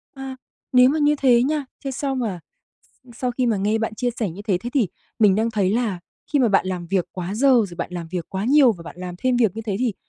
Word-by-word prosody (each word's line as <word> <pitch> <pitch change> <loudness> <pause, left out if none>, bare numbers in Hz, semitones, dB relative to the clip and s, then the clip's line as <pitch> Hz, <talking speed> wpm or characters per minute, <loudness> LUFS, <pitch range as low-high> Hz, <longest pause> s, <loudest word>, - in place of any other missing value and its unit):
À, 270 -1 -7 0.4
nếu 250 0 +7
mà 310 +3 +1
như 295 0 +3
thế 245 -4 +4
nha 295 +1 0 0.2
thế 275 - -2
sau 270 +1 -2
mà 220 -9 -3 0.4
s 255 - -29
sau 250 -1 -1
khi 250 0 0
mà 225 -3 +2
nghe 210 +3 +1
bạn 220 -1 -2
chia 245 +2 -1
sẻ 205 -6 0
như 195 +5 -9
thế, 195 -4 0
thế 240 +6 -6
thì 235 -10 +2 0.3
mình 210 -4 +5
đang 225 +2 +1
thấy 200 -4 +1
là 220 -6 -1 0.3
khi 290 - +3
mà 245 -4 +4
bạn 195 -2 +2
làm 180 -2 -3
việc 185 0 0
quá 185 +2 -4
giờ, 275 +5 +3
rồi 205 -8 +2
bạn 170 - -4
làm 170 -2 -5
việc 175 -1 -4
quá 190 +2 -3
nhiều 270 -1 +5
và 175 -5 -11
bạn 170 - -10
làm 180 -1 -6
thêm 255 +3 +1
việc 220 -4 +2
như 225 - -4
thế 205 -3 -2
thì 240 -5 0
225 Hz, 275 wpm, -22 LUFS, 190-255 Hz, 0.4 s, nếu